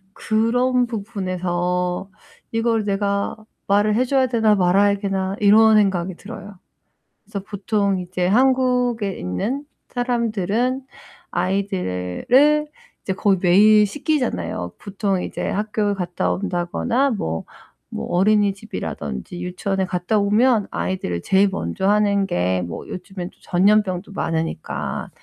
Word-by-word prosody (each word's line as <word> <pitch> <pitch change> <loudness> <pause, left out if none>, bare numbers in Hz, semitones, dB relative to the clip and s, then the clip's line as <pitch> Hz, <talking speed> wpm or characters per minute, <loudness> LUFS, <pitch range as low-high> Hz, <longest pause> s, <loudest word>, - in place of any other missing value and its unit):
그런 245 +3 +1
부분에서 185 -4 -2 0.4
'이걸 225 -1 +1
내가 200 0 -1 0.3
말을 205 +2 +3
해줘야 260 +2 +2
되나 225 -3 +3
말아야 200 +2 +3
되나.' 195 -1 -2
이런 215 +1 +6
생각이 190 -3 +1
들어요. 205 0 -10 0.7
그래서 210 -1 -6
보통 200 -1 0
이제 180 0 -2
한국에 250 -2 +2
있는 215 - -3 0.2
사람들은 240 0 -1 0.5
아이들을 195 - +1 0.4
이제 190 - -2
거의 190 0 +2
매일 210 +4 +6
씻기잖아요. 255 - -2
보통 195 -2 -2
이제 - - -4
학교에 210 0 -1
갔다 175 -2 -2
온다거나 200 +8 0
뭐 80 - -3 0.5
뭐 70 - -4
어린이집이라던지 195 - -1
유치원에 190 +2 -2
갔다오면 210 +5 +2
아이들을 90 - -2
제일 195 - +3
먼저 135 - -2
하는 205 -1 +3
게 90 - 0
뭐 85 - -7
요즘엔 185 -1 -7
또 - - -27
전염병도 195 0 +1
많으니까. 165 -3 -3
200 Hz, 275 characters per minute, -21 LUFS, 180-220 Hz, 0.7 s, 이런